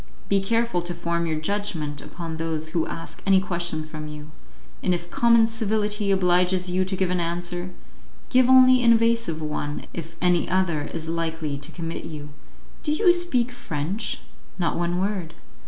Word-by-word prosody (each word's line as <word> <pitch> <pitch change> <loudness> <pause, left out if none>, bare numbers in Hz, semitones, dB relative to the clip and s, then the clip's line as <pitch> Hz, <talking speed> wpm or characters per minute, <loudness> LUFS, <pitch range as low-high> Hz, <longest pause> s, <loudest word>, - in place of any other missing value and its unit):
Be 200 - +4
careful 230 -2 +1
to 175 0 -4
form 170 0 -1
your 155 -1 -1
judgment 155 -6 -2
upon 165 -2 -6
those 160 -1 -2
who 165 0 -1
ask 165 - -7
any 195 -1 +6
questions 170 -4 -2
from 155 -1 -7
you, 150 0 -9 0.5
and 180 - +2
if 175 0 -7
common 235 -1 +5
civility 215 -2 -1
obliges 180 -1 +3
you 185 +1 +2
to 190 +1 -2
give 185 -1 0
an 180 - +1
answer, 175 +1 -2 0.6
give 255 -1 +5
only 255 -1 +7
an 235 -1 +7
evasive 230 -8 +1
one, 150 -1 -3
if 165 0 -7
any 180 -2 +2
other 175 -5 +1
is 160 +2 -6
likely 160 -2 -2
to 145 +3 -6
commit 165 0 -5
you. 150 -2 -7 0.5
Do 300 - -1
you 350 +3 +5
speak 265 -9 +1
French?" 200 -1 -3 0.4
"Not 170 -3 0
one 175 +1 0
word." 185 -4 -2
175 Hz, 170 wpm, -24 LUFS, 165-210 Hz, 0.6 s, only